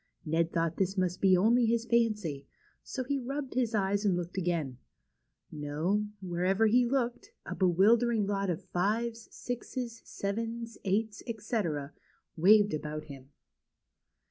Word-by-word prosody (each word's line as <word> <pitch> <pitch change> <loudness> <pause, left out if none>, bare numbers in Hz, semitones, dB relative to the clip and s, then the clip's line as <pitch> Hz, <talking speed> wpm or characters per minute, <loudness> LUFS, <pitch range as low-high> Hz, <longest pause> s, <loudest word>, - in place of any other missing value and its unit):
Ned 165 +1 +1
thought 165 0 0
this 190 +1 0
must 180 -1 0
be 190 -2 +5
only 230 +5 +4
his 230 0 +1
fancy, 210 - 0 0.3
so 260 - -4
he 280 +2 -1
rubbed 270 +2 -4
his 240 -3 0
eyes 200 0 +1
and 195 -4 +2
looked 175 0 -5
again. 165 -9 -1 0.7
No, 160 +8 -1 0.2
wherever 185 +4 +1
he 240 +3 +4
looked, 245 -2 -1 0.2
a - - -4
bewildering 210 +5 +3
lot 200 -1 -1
of 180 +3 -2
5's, 225 +5 -1
6's, 245 -1 -5
7's, 230 +3 -4
8's, 210 +2 -1
etc., 205 - -2 0.4
waved 205 +4 +5
about 155 0 -4
him. 135 -3 -11
200 Hz, 135 wpm, -30 LUFS, 175-230 Hz, 0.7 s, be